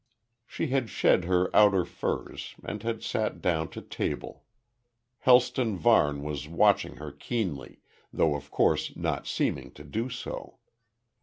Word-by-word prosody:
She 160 - -3
had 130 -3 0
shed 90 - +3
her 90 0 +1
outer 100 -4 +6
furs - - -4
and 105 - -5
had 115 0 -3
sat 110 -1 -1
down 80 -2 0
to - - -9
table. - - -4 0.8
Helston 125 -3 +4
Varne 75 -11 +3
was 75 -1 -4
watching 85 +2 +2
her 75 0 -8
keenly, 75 - -4 0.3
though 80 - +2
of 70 0 -7
course - - +1
not - - -2
seeming - - -1
to 75 - -12
do 110 - -3
so. 125 0 -7
90 Hz, 140 wpm, -28 LUFS, 75-115 Hz, 0.8 s, outer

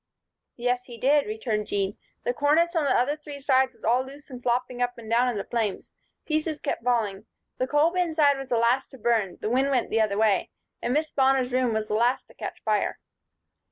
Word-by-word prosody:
"Yes, 245 +1 -1
he 240 -1 -10
did," 285 +2 +3
returned 215 -1 -2
Jean. 200 0 -1 0.3
"The 245 - 0
cornice 315 +6 +2
on 320 -3 +2
the - - +3
other 260 +5 +1
three 295 -2 -9
sides 265 -1 +2
was - - -26
all 245 +3 +3
loose 280 +2 -13
and 250 -1 -8
flopping 245 0 -1
up 245 0 -1
and 230 -2 -10
down 240 +3 +3
in 235 - -2
the 200 - -2
flames. 225 -4 -3 0.3
Pieces 310 -1 -1
kept 275 - -3
falling. 225 -5 0 0.3
The 255 - 0
coal 295 +4 +3
bin 355 -3 -1
side 285 -3 +4
was 270 -1 -7
the 240 - +2
last 235 +3 +2
to 265 - -13
burn 220 -6 0
the 215 - -1
wind 265 +3 +2
went 255 -4 0
the 225 - +3
other 205 -2 +1
way 215 -3 +2 0.3
and 240 - -1
Miss 305 +3 0
Bonner's 265 -2 +2
room 255 -1 +2
was 220 0 -1
the - - -1
last 240 +4 +2
to - - -16
catch - - -7
fire." - - 0
250 Hz, 225 wpm, -26 LUFS, 230-280 Hz, 0.3 s, side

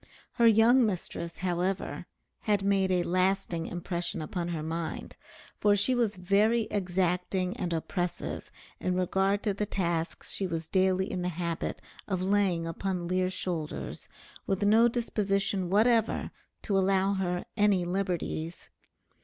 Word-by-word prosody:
Her 235 -2 +4
young 230 +3 +6
mistress, 175 -4 -3
however, 180 +2 -1 0.4
had 205 -2 +2
made 195 -1 +2
a 180 -1 +2
lasting 185 -2 0
impression 175 -1 -3
upon 170 +3 -3
her 165 -3 -3
mind; 165 +1 -4 0.4
for 205 -1 +4
she 205 +6 +2
was 235 -4 +1
very 200 +6 +3
exacting 180 -1 0
and 175 -2 -3
oppressive 175 +2 -3 0.3
in 185 0 -1
regard 190 +2 +1
to 205 - +1
the 205 +1 -2
tasks 170 -4 -2
she 195 - -1
was 165 -2 -4
daily 190 +1 +2
in 180 - -2
the 180 - -1
habit 170 -1 -3 0.3
of 190 -3 -1
laying 190 -4 +2
upon 175 +1 -3
Lear's 185 +1 0
shoulders, 165 -6 -4 0.4
with 195 0 0
no 220 +3 +6
disposition 200 -5 0
whatever 225 +3 +2 0.3
to 205 - -1
allow 195 0 +3
her 180 -2 -1
any 205 -4 +3
liberties. 175 -3 -3
185 Hz, 135 wpm, -29 LUFS, 175-200 Hz, 0.4 s, young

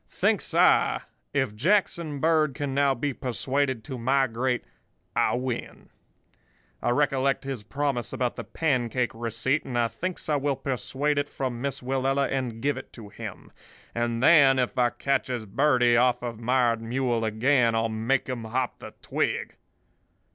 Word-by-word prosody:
Thinks - - 0
I, - - +4 0.3
if 135 -6 0
Jackson 170 - +1
Bird 155 -2 +2
can 145 -3 -3
now 140 -1 +3
be 140 +3 -2
persuaded 130 0 -1
to 130 +3 -6
migrate, 130 0 +1 0.5
I - - +2
win. 125 -1 -5 0.9
I - - 0
recollect 135 0 +1
his 135 -4 -4
promise 135 +2 -2
about 125 -2 -1
the - - -5
pancake 125 -5 0
receipt, 115 +5 -1
and 125 -3 -4
I 120 -1 +3
thinks 185 +6 -5
I 150 -2 +2
will 140 0 0
persuade 140 +3 -1
it 145 - -1
from 125 -4 -4
Miss 140 0 -3
Willella 135 +2 0
and 125 -4 -3
give 145 -2 +1
it 130 - -9
to 110 -4 -10
him; - - -9 0.4
and 120 0 -1
then 140 -4 +7
if 125 -1 0
I 125 -1 +3
catches 130 -3 -1
Birdie 125 +2 +3
off 125 0 +3
of 115 -2 -5
Mired 120 -1 +2
Mule 120 0 -1
again, 115 +2 +2
I'll 115 0 +1
make 115 +5 0
him 125 -4 -4
hop 125 +3 -2
the - - -10
twig. - - -1
130 Hz, 155 wpm, -26 LUFS, 120-140 Hz, 0.9 s, then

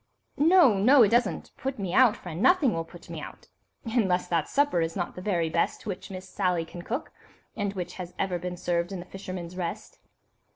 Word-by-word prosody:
"No, 300 - +6
no, 255 +5 +7
it 205 - +4
doesn't 235 -2 +1
put 270 0 -3
me 190 -4 -3
out, 250 -5 +5
friend; 175 0 -7
nothing 290 -2 +4
will 165 - -2
put 175 +1 -14
me - - -6
out, - - -11 0.4
unless 210 -6 +1
that 165 -3 0
supper 285 -11 +2
is 165 0 -2
not 175 -2 -3
the 180 - -8
very 180 -4 0
best 165 +6 -1
which 195 -4 -5
Miss 190 -1 -8
Sally 180 -3 0
can 175 +2 -9
cook, 245 - -4 0.4
and 205 -2 -2
which 180 -2 -5
has 180 -1 -7
ever 180 -2 -1
been 180 +1 -5
served 175 +1 -1
in 195 - -4
'The 175 - -8
Fisherman's 185 -2 -7
Rest. 175 -2 -5
185 Hz, 205 wpm, -27 LUFS, 175-225 Hz, 0.4 s, no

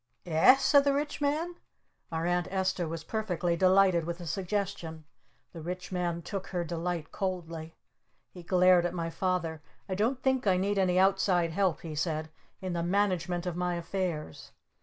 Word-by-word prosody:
"Eh?" 165 +9 +6
said 280 +1 +4
the 280 -1 +2
Rich 295 +1 -2
Man. 315 +5 -1 0.5
Our 165 0 -2
Aunt 175 0 +1
Esta 190 -2 0
was 165 0 -5
perfectly 180 -4 -1
delighted 185 -1 +4
with 170 +1 -4
the 175 - -8
suggestion. 175 -3 -3 0.5
The 165 - -8
Rich 180 +4 -6
Man 175 -2 -2
took 195 +1 -5
her 175 -2 -2
delight 170 -1 -3
coldly. 165 -4 -4 0.6
He 180 - -10
glared 180 0 +4
at 175 - -6
my 165 -1 -2
Father. 165 -3 -1 0.3
"I 190 - -3
don't 225 +7 0
think 265 -4 +1
I 185 -1 +4
need 200 +2 0
any 180 -1 +2
outside 190 -3 +3
help," 185 -1 +1
he 160 -2 -6
said, 155 0 -2 0.3
"in 185 -1 -2
the 170 - -1
management 180 -1 0
of 180 -2 -2
my 180 0 -1
affairs. 170 - -4
180 Hz, 170 wpm, -30 LUFS, 170-195 Hz, 0.6 s, Eh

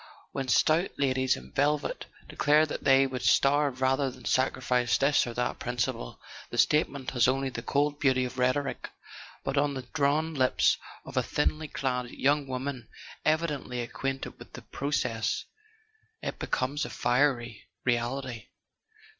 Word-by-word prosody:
When 135 -1 -3
stout 160 +7 +3
ladies 130 -2 +2
in 65 0 -12
velvet 145 +1 0 0.2
declare 150 +2 +3
that 150 - -6
they 135 0 +5
would 130 -1 -4
starve 140 -2 +3
rather 135 +1 +2
than 125 -1 -13
sacrifice 125 -1 +1
this 140 -1 +3
or 120 - -6
that 125 0 -1
principle, 120 - -3 0.3
the 120 - -6
statement 140 +1 +2
has 125 -2 +3
only 135 +1 +1
the 120 - -5
cold 145 +3 0
beauty 130 -3 +3
of 125 +1 -6
rhetoric; 130 +2 0 0.5
but 135 +1 0
on 145 -1 +1
the 130 - -5
drawn 155 +2 +1
lips 130 -3 +3 0.3
of - - -8
a - - +5
thinly 155 0 -1
clad 125 -3 -2
young 140 +2 +1
woman 130 -2 -4 0.4
evi¬ 155 +2 +3
dently 125 -5 -4
acquainted 135 +3 -4
with - - -13
the - - -9
process, 130 -6 -1 0.8
it - - -4
becomes 140 +3 -1
a 120 - -4
fiery 120 -1 0 0.2
reality. 120 0 -1
135 Hz, 150 wpm, -28 LUFS, 125-145 Hz, 0.8 s, they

